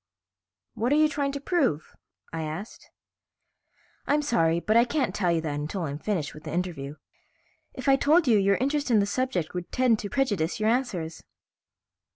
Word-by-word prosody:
"What 240 Hz, +4 st, -1 dB
are -, -, +4 dB
you 310 Hz, 0 st, +5 dB
trying 285 Hz, -2 st, -1 dB
to 280 Hz, -, -3 dB
prove?" 275 Hz, -, 0 dB, 0.4 s
I 165 Hz, -, -3 dB
asked. 160 Hz, +7 st, -7 dB, 1.2 s
"I'm 295 Hz, +1 st, +2 dB
sorry, 170 Hz, -, +2 dB
but 215 Hz, +5 st, 0 dB
I 235 Hz, -, +7 dB
can't 270 Hz, +3 st, -1 dB
tell 180 Hz, -4 st, +1 dB
you 165 Hz, -1 st, +1 dB
that 155 Hz, -2 st, -3 dB
until 150 Hz, +6 st, -3 dB
I'm 145 Hz, -2 st, -4 dB
finished 175 Hz, -6 st, -2 dB
with 150 Hz, -, -12 dB
the 155 Hz, -, -5 dB
interview. 160 Hz, -5 st, -3 dB, 0.8 s
If -, -, -6 dB
I 270 Hz, 0 st, +6 dB
told 310 Hz, +3 st, +3 dB
you, 220 Hz, -4 st, +5 dB
your 200 Hz, 0 st, +3 dB
interest 285 Hz, +4 st, -1 dB
in 230 Hz, -, +4 dB
the 200 Hz, -, +3 dB
subject 225 Hz, -6 st, -2 dB
would 180 Hz, -1 st, -5 dB
tend 250 Hz, -4 st, +2 dB
to 205 Hz, -, -5 dB
prejudice 205 Hz, -, 0 dB
your 215 Hz, +1 st, +2 dB
answers." 195 Hz, -10 st, -1 dB
210 Hz, 185 wpm, -26 LUFS, 165-270 Hz, 1.2 s, I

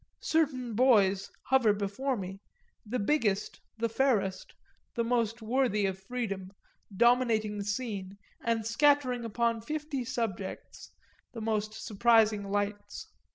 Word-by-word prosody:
Certain 270 Hz, -7 st, 0 dB
boys 205 Hz, -5 st, +4 dB
hover 250 Hz, -5 st, +4 dB
before 210 Hz, +7 st, -2 dB
me, 190 Hz, 0 st, -6 dB, 0.5 s
the 245 Hz, +4 st, -1 dB
biggest, 210 Hz, -4 st, 0 dB, 0.2 s
the 230 Hz, +1 st, 0 dB
fairest, 215 Hz, -6 st, 0 dB, 0.4 s
the 235 Hz, -, +1 dB
most 230 Hz, -1 st, 0 dB
worthy 230 Hz, -3 st, +1 dB
of 190 Hz, -1 st, -2 dB
freedom, 195 Hz, -3 st, -4 dB, 0.5 s
dominating 230 Hz, -3 st, +3 dB
the -, -, -2 dB
scene 205 Hz, -3 st, -4 dB, 0.3 s
and 230 Hz, -1 st, 0 dB
scattering 255 Hz, 0 st, +3 dB
upon 230 Hz, 0 st, 0 dB
fifty 300 Hz, +1 st, -3 dB
subjects 225 Hz, -6 st, -5 dB, 0.4 s
the 230 Hz, -, -6 dB
most 215 Hz, -1 st, -1 dB
surprising 220 Hz, -2 st, +3 dB
lights. 205 Hz, +1 st, -3 dB
225 Hz, 115 wpm, -30 LUFS, 205-250 Hz, 0.5 s, boys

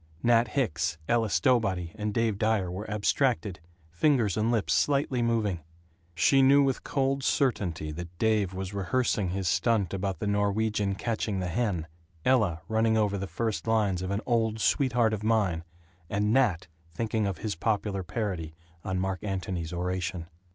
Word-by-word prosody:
Nat 120 Hz, 0 st, +4 dB
Hicks, 105 Hz, -, -1 dB
Ella 115 Hz, -2 st, +2 dB
Stowbody, 95 Hz, -2 st, +1 dB
and 105 Hz, -1 st, -3 dB
Dave 110 Hz, -2 st, 0 dB
Dyer 105 Hz, -5 st, +1 dB
were 100 Hz, +5 st, -6 dB
abstracted, 105 Hz, -, 0 dB, 0.3 s
fingers 110 Hz, -, +2 dB
and 110 Hz, +1 st, +1 dB
lips 110 Hz, -5 st, +1 dB
slightly 140 Hz, -3 st, +1 dB
moving. 110 Hz, -6 st, 0 dB, 0.6 s
She 135 Hz, +10 st, +4 dB
knew 140 Hz, +2 st, +6 dB
with 135 Hz, -2 st, +1 dB
a -, -, -31 dB
cold 135 Hz, 0 st, -1 dB
certainty 90 Hz, -, 0 dB
that 85 Hz, +2 st, -8 dB
Dave 110 Hz, -3 st, +1 dB
was 95 Hz, +1 st, -5 dB
rehearsing 100 Hz, 0 st, 0 dB
his 95 Hz, 0 st, -2 dB
"stunt" 105 Hz, -6 st, +1 dB
about 95 Hz, -1 st, -2 dB
the 95 Hz, -, -4 dB
Norwegian 100 Hz, 0 st, 0 dB
catching 110 Hz, -1 st, -2 dB
the 90 Hz, -1 st, -2 dB
hen, 90 Hz, -4 st, -1 dB, 0.4 s
Ella 105 Hz, -11 st, +2 dB
running 110 Hz, 0 st, +2 dB
over 105 Hz, -2 st, +1 dB
the 100 Hz, -, -4 dB
first 115 Hz, +2 st, -3 dB
lines 105 Hz, -5 st, +1 dB
of 95 Hz, -, -3 dB
"An 100 Hz, +2 st, -1 dB
Old 115 Hz, -2 st, +1 dB
Sweetheart 120 Hz, -2 st, +2 dB
of 105 Hz, -, -3 dB
Mine," 105 Hz, -7 st, +1 dB, 0.5 s
and 105 Hz, +2 st, +1 dB
Nat 110 Hz, -10 st, +2 dB, 0.2 s
thinking 110 Hz, +4 st, -1 dB
of 95 Hz, -, -3 dB
his 110 Hz, -2 st, -3 dB
popular 100 Hz, +1 st, -1 dB
parody 90 Hz, -5 st, -4 dB, 0.3 s
on 95 Hz, -1 st, -2 dB
Mark 95 Hz, 0 st, -2 dB
Antony's 95 Hz, -4 st, -3 dB
oration. 90 Hz, -1 st, -3 dB
105 Hz, 160 wpm, -28 LUFS, 95-115 Hz, 0.6 s, knew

